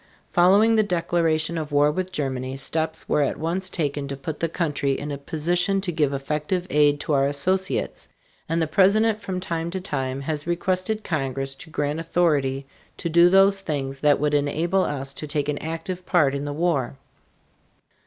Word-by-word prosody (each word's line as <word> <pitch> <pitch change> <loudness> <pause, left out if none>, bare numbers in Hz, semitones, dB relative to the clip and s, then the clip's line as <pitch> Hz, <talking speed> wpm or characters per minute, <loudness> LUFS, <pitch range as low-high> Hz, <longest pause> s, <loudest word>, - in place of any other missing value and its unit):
Following 200 +6 +5
the - - +6
declaration 170 -4 0
of 155 -1 -5
war 145 +1 +4
with 185 +3 -3
Germany, 130 -5 -2
steps 160 +3 -2
were 150 - +2
at 140 - 0
once 180 +4 -1
taken 145 -5 -2
to 140 0 -5
put 150 +3 -6
the 165 - 0
country 145 -5 -1
in 145 +1 -5
a 140 - -3
position 175 +6 0
to 190 -2 -2
give 150 -4 +1
effective 150 +6 -2
aid 145 -1 +4
to 150 - -1
our 135 -1 +3
associates, 185 +7 -1 0.4
and 165 +1 +1
the 165 - +2
President 210 +6 +3
from 185 -1 -4
time 170 -2 -3
to 190 +2 -4
time 135 -7 -3
has 150 +2 -3
requested 185 +5 -1
Congress 135 -3 -2
to 135 +5 -12
grant 150 0 -2
authority 150 -5 0 0.3
to 170 - -3
do 170 +2 +6
those 195 +1 +4
things 135 -6 -3
that 145 -1 +3
would 150 +1 0
enable 160 +6 +1
us 135 -3 -3
to 150 - -7
take 145 -1 -1
an 150 -1 -2
active 165 +3 -5
part 155 -7 +2
in 140 +1 -3
the 145 - -3
war. 145 -6 -1
155 Hz, 185 wpm, -24 LUFS, 145-180 Hz, 0.4 s, the